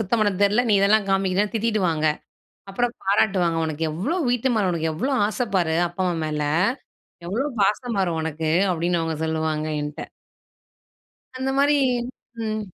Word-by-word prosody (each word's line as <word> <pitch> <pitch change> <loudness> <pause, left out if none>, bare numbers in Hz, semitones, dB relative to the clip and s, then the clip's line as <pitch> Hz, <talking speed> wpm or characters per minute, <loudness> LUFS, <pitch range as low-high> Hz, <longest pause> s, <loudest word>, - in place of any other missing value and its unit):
சுத்தம் 220 +2 0
பண்ண 205 -1 +3
தெரியல. 210 +5 +4
நீ - - +3
இதெல்லாம் 200 +1 +3
காமிக்கிறன்னு" 195 +2 +1
திட்டிடு 220 -1 0
வாங்க 155 -1 0 0.6
அப்புறம் 240 +4 -1
பாராட்டுவாங்க. 190 -4 +2
"உனக்கு 155 0 -3
எவ்வளோ 230 - -2
வீட்டு 245 +1 +1
மேல 200 -4 +2
உனக்கு 160 -1 -1
எவ்வளோ 260 - -2 0.2
ஆசை 240 +3 -2
பாரு! 165 -3 +2
அப்பா, 175 +2 -6
அம்மா 175 - -1
மேல! 150 -1 -2 0.9
எவ்வளோ 235 +10 -1
பாசம்பாரு 200 -3 +1
உனக்கு." 160 0 -2 0.2
அப்படின்னு 175 0 0
அவங்க 165 0 -2
சொல்வாங்க 160 -1 -1 0.2
என்ட்ட. 150 +1 -5 1.4
அந்த 265 +1 -1
மாரி 290 +1 +4 0.7
ம். 215 -1 -2
195 Hz, 145 wpm, -23 LUFS, 160-220 Hz, 1.4 s, தெரியல